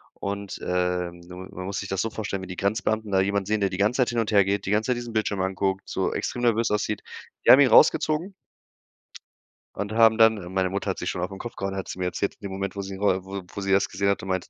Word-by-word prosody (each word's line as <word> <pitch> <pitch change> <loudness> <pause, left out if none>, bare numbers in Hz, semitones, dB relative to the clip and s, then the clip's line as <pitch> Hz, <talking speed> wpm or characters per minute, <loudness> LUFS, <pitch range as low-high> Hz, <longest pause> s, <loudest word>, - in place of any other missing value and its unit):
Und, 100 0 -5
ähm, 90 -1 -1
du 90 +1 -11
man 95 - -9
man 90 - -6
muss 100 +1 -3
sich 95 - -6
das 95 - -1
so 115 - -1
vorstellen, 105 -3 -4
wie - - -7
die 90 - -7
Grenzbeamten 110 0 -1
da 95 - +3
jemanden 100 0 0
sehen, 105 +1 0
der 100 - +2
die 95 - -5
ganze 105 +5 +1
Zeit 125 - +2
hin 120 - -1
und 115 -2 -1
hergeht, 100 -1 +3
die 95 - -2
ganze 110 +4 +1
Zeit 125 - +1
diesen 120 -1 -6
Bildschirm 105 -3 0
anguckt, 95 0 -1
so - - -1
extrem 120 - -3
nervös 115 -1 +2
aussieht. 105 0 -1 0.4
Die - - +8
haben 130 - +9
ihn 135 - +6
rausgezogen 155 - +4 1.4
und 105 +1 -4
haben 110 0 +5
dann, 110 -1 +6
äh 90 -3 -8
meine 95 0 0
Mutter 100 +1 -2
hat 95 - -3
sich - - -2
schon 90 - -4
auf 90 - -2
'n 95 - -8
Kopf 120 +3 -7
gehauen, 95 0 -3
hat 95 - -5
sie - - -6
mir 90 - -1
erzählt 95 +2 -2
in 100 - -9
dem - - -8
Moment, 95 0 -4
wo 100 - -3
sie 95 0 -6
ihn 95 - -9
ro 95 -2 +1
wo 95 0 -6
wo - - -4
sie 100 0 -3
das 95 - +3
gesehen 100 - -1
hat 100 - +1
und 95 - -7
meinte: 95 -1 -2
100 Hz, 285 wpm, -25 LUFS, 95-110 Hz, 1.4 s, haben